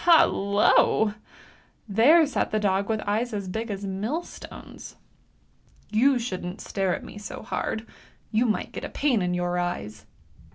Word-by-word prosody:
Hallo! 210 - +4 0.7
there 260 - +6
sat 285 - -1
the 215 - 0
dog 200 0 +1
with 220 -1 0
eyes 220 +4 -1
as 200 -2 -4
big 220 +5 -4
as 200 -1 -4
millstones. 215 - -6 0.5
" - - -34
You 275 0 +5
shouldn't 185 -6 -4
stare 190 -3 -1
at - - -8
me 205 - -9
so 205 - -7
hard; 220 +1 -3 0.5
you 235 +2 +2
might 215 - -1
get - - -7
a - - -4
pain 255 -8 +1
in 180 0 0
your 175 0 -1
eyes! 175 -12 -4
210 Hz, 155 wpm, -26 LUFS, 190-235 Hz, 0.7 s, there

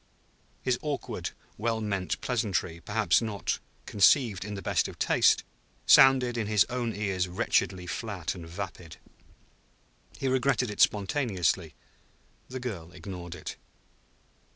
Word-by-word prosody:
His 125 -1 +1
awkward, 150 -2 -3 0.3
well 115 0 0
meant 100 -5 -2
pleasantry, 100 -8 -1
perhaps 105 +1 +2
not 110 -4 -2 0.3
conceived 105 -1 +4
in 105 +1 -5
the 95 - -6
best - - +1
of - - -10
taste, - - +3 0.4
sounded 125 -3 +6
in 110 - -1
his 105 -1 +4
own 120 -2 -2
ears 95 -3 -1
wretchedly 90 0 0
flat 90 -2 -4
and 85 -3 -9
vapid. 90 -1 -7 1.2
He 135 - -2
regretted 130 -2 +1
it 105 - -2
spontaneously; 100 - +1 0.7
the 130 - -6
girl 95 -10 -6
ignored 90 -1 -8
it. 80 - -7
105 Hz, 125 wpm, -28 LUFS, 90-120 Hz, 1.2 s, sounded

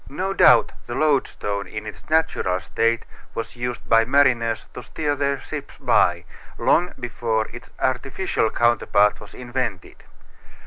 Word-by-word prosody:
No 185 +8 -2
doubt - - +6 0.2
the 120 - -4
loadstone 130 -9 0
in 110 0 -6
its 105 - -10
natural 155 - +1
state 115 +7 0 0.3
was 115 - -5
used 120 0 -5
by 115 0 +5
mariners 120 -3 +2
to - - -7
steer 150 -2 -2
their 140 0 0
ships - - -8
by, - - +2 0.3
long 175 +2 +2
before 115 -2 -1
its 120 - -11
artificial 130 0 -1
counterpart 110 -3 +2
was 100 - -13
invented. 120 -6 -4
120 Hz, 135 wpm, -22 LUFS, 110-140 Hz, 0.3 s, doubt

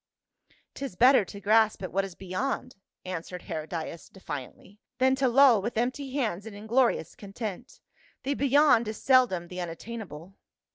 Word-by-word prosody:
" - - -37
'Tis 275 -9 -6
better 255 +2 +6
to 200 +2 -10
grasp 215 0 +3
at 185 - -5
what 195 +1 +1
is 195 -3 -7
beyond," 250 +8 -3 0.3
answered 180 0 -6
Hcrodias 160 +1 -6
defiantly, 185 +3 -9 0.2
"than 260 0 +3
to 265 0 +1
loll 250 -3 +6
with 230 +3 -4
empty 255 +3 -2
hands 220 -7 -2
in 215 - -9
inglorious 220 -4 +1
content. 215 +1 -7 0.4
The 275 - 0
beyond 280 -4 +4
is 215 -1 -4
seldom 250 -10 +3
the 180 - -9
unat 170 -2 -4
tainable." 195 -7 -9
215 Hz, 155 wpm, -28 LUFS, 185-255 Hz, 0.4 s, better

